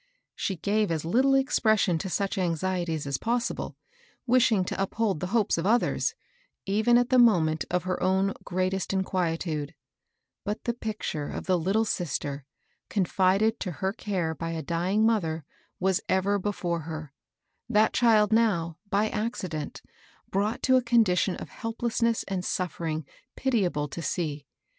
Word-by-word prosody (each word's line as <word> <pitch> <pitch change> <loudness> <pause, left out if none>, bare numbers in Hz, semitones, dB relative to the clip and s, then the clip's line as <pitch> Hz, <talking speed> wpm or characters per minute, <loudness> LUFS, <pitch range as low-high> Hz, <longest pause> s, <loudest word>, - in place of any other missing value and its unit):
She 195 - -2
gave 205 +4 0 0.2
little 260 +10 +3
expression' 220 -9 +2
to 190 - -4
such 195 +2 -1
anxieties 175 -2 -1
as 140 -1 -2
possible, 235 +1 -2 0.5
wishing 235 -6 +4
to - - -3
uphold 195 -2 0
the 180 - -3
hopes 210 -3 +1
of 170 - -1
others, 235 +3 +2 0.5
even 215 +5 +3
at 245 0 +2
the 255 - +5
moment 160 - +4
of 180 -1 0
her 185 0 -2
own 190 +1 +2
greatest 185 +1 -1
inquietude; 165 -5 -1 0.7
but 210 +2 -3
the 235 - 0
picture 210 -10 -4
of - - -5
the 185 -2 +2
Uttle 200 +7 +1
sister, 145 -7 -3 0.4
confided 195 +3 +2
to 180 - -3
her 190 +3 -2
care 185 -7 -2
by 165 +2 -4
a 160 -1 -4
dying 180 +7 +1
mother, 165 - 0 0.3
was 190 0 +1
ever 195 +2 +2
before 180 -4 -2
her, 155 -2 -7 0.3
— 145 - -52
that 215 +1 +4
child 220 -3 +4
now, 170 -8 +2
by 205 +2 +2
accident, 190 -9 -4 0.5
brought 205 +3 -1
to 260 0 +5
a - - +3
condition 220 -6 +3
of - - -8
helplessness 230 0 -1
and 190 -2 -2
suffering 160 -4 -2 0.3
pitiable 190 - 0
to 170 - -6
see. 150 -4 -3
190 Hz, 150 wpm, -27 LUFS, 165-220 Hz, 0.7 s, the